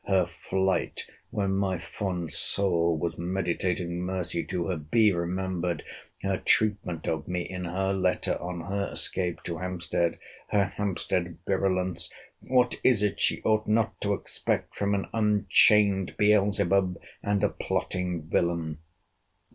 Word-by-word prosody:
Her 95 Hz, -2 st, +4 dB
flight, 95 Hz, +2 st, -1 dB, 0.2 s
when 100 Hz, -2 st, -1 dB
my 95 Hz, -1 st, +1 dB
fond 90 Hz, -1 st, -4 dB
soul 85 Hz, -4 st, +2 dB
was 85 Hz, +2 st, -3 dB
meditating 90 Hz, 0 st, -1 dB
mercy 90 Hz, -2 st, -2 dB
to 90 Hz, -2 st, -2 dB
her!—Be 95 Hz, +6 st, +3 dB
remembered 90 Hz, -1 st, -2 dB, 0.4 s
her 95 Hz, -1 st, 0 dB
treatment 100 Hz, -6 st, +1 dB
of 80 Hz, -1 st, -1 dB
me 90 Hz, -1 st, -1 dB
in 90 Hz, -1 st, -5 dB
her 95 Hz, +3 st, 0 dB
letter 95 Hz, -1 st, +1 dB
on 90 Hz, -1 st, -4 dB
her 100 Hz, +3 st, -2 dB
escape 90 Hz, -2 st, -2 dB
to 85 Hz, -2 st, -4 dB
Hampstead! 85 Hz, -1 st, -1 dB, 0.3 s
Her 100 Hz, -1 st, +3 dB
Hampstead 90 Hz, -4 st, -2 dB
virulence! 95 Hz, -3 st, 0 dB, 0.3 s
What 125 Hz, -1 st, +2 dB
is 115 Hz, -5 st, +4 dB
it 105 Hz, -, 0 dB
she -, -, +2 dB
ought 110 Hz, -1 st, +2 dB
not 110 Hz, 0 st, +1 dB
to 100 Hz, 0 st, +1 dB
expect -, -, -2 dB
from 100 Hz, 0 st, +1 dB
an 100 Hz, -, -1 dB
unchained 105 Hz, -2 st, +4 dB
Beelzebub, 100 Hz, -3 st, +3 dB, 0.2 s
and 100 Hz, 0 st, 0 dB
a 105 Hz, -, +4 dB
plotting 90 Hz, -3 st, -2 dB
villain? 80 Hz, -1 st, 0 dB
95 Hz, 130 wpm, -28 LUFS, 85-100 Hz, 0.4 s, Her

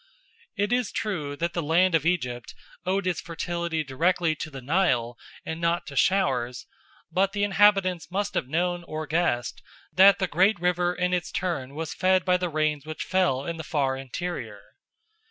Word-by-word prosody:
It 205 Hz, +3 st, +1 dB
is 245 Hz, -4 st, 0 dB
true 155 Hz, -10 st, -3 dB
that 170 Hz, +3 st, -2 dB
the 170 Hz, -, -1 dB
land 170 Hz, +4 st, +3 dB
of 165 Hz, -1 st, +2 dB
Egypt 125 Hz, -9 st, -2 dB, 0.3 s
owed 190 Hz, +1 st, 0 dB
its 180 Hz, -2 st, -1 dB
fertility 170 Hz, -1 st, -3 dB
directly 165 Hz, +4 st, +1 dB
to -, -, -5 dB
the 135 Hz, -3 st, -8 dB
Nile 125 Hz, -5 st, +1 dB, 0.3 s
and 160 Hz, +1 st, -5 dB
not 170 Hz, +1 st, +1 dB
to 140 Hz, -, -9 dB
showers; 130 Hz, -9 st, +1 dB, 0.5 s
but 195 Hz, +1 st, +1 dB
the 205 Hz, -1 st, 0 dB
inhabitants 195 Hz, -5 st, +3 dB
must 200 Hz, +3 st, -2 dB
have -, -, -1 dB
known 175 Hz, +4 st, -1 dB
or 155 Hz, -1 st, -5 dB
guessed 145 Hz, -6 st, -1 dB, 0.3 s
that 195 Hz, +1 st, +7 dB
the 190 Hz, -, 0 dB
great 190 Hz, +3 st, +2 dB
river 180 Hz, 0 st, +1 dB
in 180 Hz, 0 st, 0 dB
its 180 Hz, -1 st, -1 dB
turn 145 Hz, -7 st, -3 dB
was 160 Hz, 0 st, -4 dB
fed 185 Hz, -1 st, +2 dB
by 180 Hz, -1 st, +3 dB
the 180 Hz, -1 st, -2 dB
rains 155 Hz, -2 st, 0 dB
which 155 Hz, 0 st, -5 dB
fell 180 Hz, -8 st, +1 dB
in 170 Hz, -1 st, -4 dB
the 160 Hz, -, -5 dB
far 140 Hz, -4 st, 0 dB
interior. 130 Hz, -5 st, -5 dB
170 Hz, 175 wpm, -26 LUFS, 145-185 Hz, 0.5 s, that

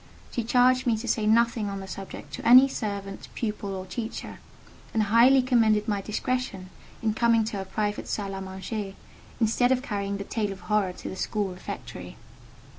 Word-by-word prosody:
She 240 Hz, -, -2 dB
charged 250 Hz, +2 st, +3 dB
me 230 Hz, -2 st, +3 dB
to 235 Hz, +3 st, -6 dB
say 215 Hz, -2 st, +1 dB
nothing 230 Hz, -1 st, +3 dB
on 195 Hz, 0 st, -4 dB
the 195 Hz, -, -7 dB
subject 185 Hz, -6 st, -8 dB
to -, -, -6 dB
any 255 Hz, +3 st, +8 dB
servant, 200 Hz, -6 st, -5 dB
pupil, 210 Hz, -3 st, -3 dB
or 185 Hz, 0 st, -5 dB
teacher, 225 Hz, +4 st, -6 dB, 0.6 s
and 220 Hz, -, +3 dB
highly 240 Hz, +5 st, +6 dB
commended 225 Hz, -4 st, +3 dB
my 205 Hz, -2 st, 0 dB
discretion 215 Hz, -3 st, -3 dB, 0.3 s
in 220 Hz, -1 st, +2 dB
coming 230 Hz, 0 st, +3 dB
to 215 Hz, -1 st, -3 dB
her 190 Hz, -, -4 dB
private 205 Hz, +2 st, -2 dB
salle 200 Hz, -2 st, -3 dB
à 195 Hz, 0 st, -5 dB
manger, 195 Hz, +1 st, -5 dB, 0.4 s
instead 245 Hz, +2 st, +3 dB
of 260 Hz, 0 st, +2 dB
carrying 200 Hz, -4 st, -2 dB
the 200 Hz, -, -4 dB
tale 210 Hz, 0 st, -2 dB
of 195 Hz, -, -8 dB
horror 210 Hz, -4 st, +1 dB
to -, -, -8 dB
the -, -, -5 dB
school 205 Hz, +1 st, -1 dB
refectory. 180 Hz, 0 st, -8 dB
215 Hz, 185 wpm, -27 LUFS, 195-235 Hz, 0.6 s, any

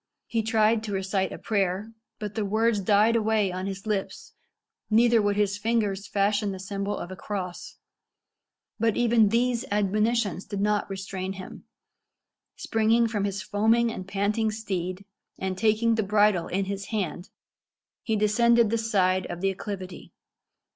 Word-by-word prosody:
He 230 Hz, -, -1 dB
tried 220 Hz, 0 st, +2 dB
to 205 Hz, -, -4 dB
recite 190 Hz, 0 st, -1 dB
a -, -, -6 dB
prayer, 200 Hz, +1 st, -1 dB, 0.2 s
but 210 Hz, -1 st, -5 dB
the 220 Hz, -, -1 dB
words 220 Hz, +2 st, +1 dB
died 210 Hz, +3 st, +3 dB
away 215 Hz, -3 st, +2 dB
on 185 Hz, +1 st, -4 dB
his 195 Hz, +1 st, -6 dB
lips 210 Hz, -3 st, -3 dB, 0.6 s
neither 230 Hz, +1 st, +4 dB
would 205 Hz, 0 st, +1 dB
his 205 Hz, 0 st, 0 dB
fingers 205 Hz, -3 st, 0 dB
fashion 200 Hz, +1 st, +1 dB
the 190 Hz, -, -5 dB
symbol 200 Hz, +1 st, -3 dB
of 175 Hz, -, -6 dB
a -, -, -6 dB
cross. 185 Hz, -2 st, -6 dB, 1.0 s
But 225 Hz, -1 st, +1 dB
even 235 Hz, -3 st, +4 dB
these 240 Hz, +2 st, +1 dB
admonitions 210 Hz, 0 st, 0 dB
did 200 Hz, -, -5 dB
not 210 Hz, 0 st, 0 dB
restrain 190 Hz, -1 st, -4 dB
him. 190 Hz, -1 st, -10 dB, 0.9 s
Springing 225 Hz, +1 st, +2 dB
from 210 Hz, -3 st, -1 dB
his 200 Hz, -1 st, -3 dB
foaming 225 Hz, +3 st, +2 dB
and 185 Hz, -4 st, -7 dB
panting 205 Hz, +3 st, 0 dB
steed, 190 Hz, -3 st, -4 dB, 0.3 s
and 190 Hz, 0 st, -3 dB
taking 220 Hz, +3 st, +2 dB
the 225 Hz, -, +1 dB
bridle 205 Hz, -3 st, +2 dB
in 195 Hz, +1 st, -1 dB
his 200 Hz, 0 st, -4 dB
hand, 185 Hz, -4 st, -3 dB, 0.7 s
he 220 Hz, -, -1 dB
descended 230 Hz, +2 st, +3 dB
the 230 Hz, -, +1 dB
side 185 Hz, -4 st, +1 dB
of 175 Hz, -, -6 dB
the 195 Hz, 0 st, +2 dB
acclivity. 190 Hz, -1 st, -7 dB
205 Hz, 155 wpm, -26 LUFS, 195-220 Hz, 1.0 s, neither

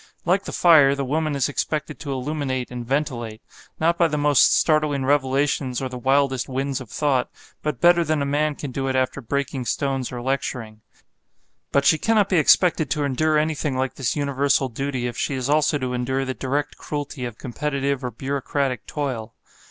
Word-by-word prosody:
Like 185 Hz, +3 st, +2 dB
the -, -, -5 dB
fire, 150 Hz, -5 st, +6 dB
the 140 Hz, -1 st, -2 dB
woman 155 Hz, +2 st, -1 dB
is 135 Hz, -2 st, +1 dB
expected 150 Hz, +1 st, -3 dB
to 145 Hz, -, -5 dB
illuminate 130 Hz, -2 st, -3 dB
and 125 Hz, -1 st, -5 dB
ventilate, 120 Hz, -4 st, -2 dB, 0.4 s
not 170 Hz, +2 st, +2 dB
by 170 Hz, -, +5 dB
the 150 Hz, -1 st, -2 dB
most 145 Hz, -1 st, +4 dB
startling 150 Hz, -4 st, +2 dB
revelations 135 Hz, -2 st, +1 dB
or 130 Hz, -, -3 dB
the 125 Hz, -, -6 dB
wildest 135 Hz, 0 st, +1 dB
winds 135 Hz, +1 st, -2 dB
of 125 Hz, -, -10 dB
thought, 135 Hz, -3 st, 0 dB, 0.3 s
but 150 Hz, -5 st, -3 dB
better 175 Hz, 0 st, +5 dB
than 155 Hz, -2 st, 0 dB
a 140 Hz, -, 0 dB
man 145 Hz, +1 st, 0 dB
can 140 Hz, -2 st, -6 dB
do 135 Hz, +1 st, -3 dB
it 130 Hz, -, -1 dB
after 130 Hz, +2 st, 0 dB
breaking 135 Hz, +1 st, -2 dB
stones 135 Hz, -1 st, -1 dB
or 125 Hz, -, -5 dB
lecturing. 120 Hz, -4 st, -3 dB, 0.9 s
But 140 Hz, 0 st, +2 dB
she 160 Hz, -, +5 dB
cannot 215 Hz, 0 st, +2 dB
be 185 Hz, -, +2 dB
expected 160 Hz, 0 st, +4 dB
to 150 Hz, -2 st, 0 dB
endure 155 Hz, +3 st, +1 dB
anything 150 Hz, -3 st, -1 dB
like 130 Hz, 0 st, -1 dB
this 135 Hz, -3 st, -2 dB
universal 140 Hz, -2 st, +1 dB
duty 130 Hz, +1 st, -3 dB
if 120 Hz, -1 st, -4 dB
she 140 Hz, -, -1 dB
is 130 Hz, +1 st, -2 dB
also 150 Hz, 0 st, +3 dB
to 130 Hz, -2 st, -3 dB
endure 130 Hz, +2 st, -1 dB
the 130 Hz, -, -2 dB
direct 140 Hz, +3 st, -2 dB
cruelty 145 Hz, -2 st, -5 dB
of 120 Hz, -2 st, -7 dB
competitive 140 Hz, +1 st, -2 dB
or 125 Hz, -, -2 dB
bureaucratic 135 Hz, +1 st, -2 dB
toil. 125 Hz, -7 st, -4 dB
140 Hz, 190 wpm, -23 LUFS, 130-150 Hz, 0.9 s, fire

